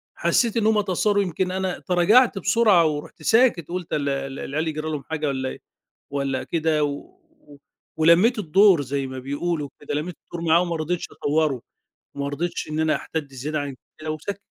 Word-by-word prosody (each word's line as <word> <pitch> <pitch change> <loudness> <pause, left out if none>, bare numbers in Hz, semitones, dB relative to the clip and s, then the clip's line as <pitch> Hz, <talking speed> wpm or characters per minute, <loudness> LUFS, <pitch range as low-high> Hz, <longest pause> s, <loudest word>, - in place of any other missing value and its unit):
حسّيت 235 -2 +1
إن 220 - +1
هُم 220 -1 +3
اتأثّروا 205 +1 +1
يمكن 180 +1 -2
أنا 190 -1 -2
تراجعت 200 +6 +4
بسرعة، 205 -5 +4
ورُحت 150 -1 -5
ساكت 225 - +3
قُلت 180 -1 -5
ال 145 -2 0
ال 135 0 -3
العيال 155 +4 -2
يجرى 155 0 -4
لهم 145 -2 -4
حاجة 155 -2 -3
والَّا 130 -1 -2
إيه - - -8 0.5
والَّا 140 -2 -1
كده، 160 -2 0
و 145 - -7 0.8
ولمّيت 175 +9 +5
الدور 190 -1 +5
زي 140 0 -2
ما 130 0 -6
بيقولوا 145 +2 -3
كده، 145 - -6
لمّيت 160 +4 -3
الدور 170 - -7
معاهم 170 +2 +4
ما 170 - -1
رضيتش 165 +2 -2
أطوّره، 145 -4 0 0.5
ما 140 0 -3
رضيتش 165 +3 -3
إن 155 - -2
أنا 160 -1 +2
أحتدّ 145 -4 -5
زيادة 150 +4 -3
عن 140 -2 -5 0.2
كده 155 0 -4
وسكَتّ 195 +6 -5
160 Hz, 175 wpm, -23 LUFS, 145-185 Hz, 0.8 s, ولمّيت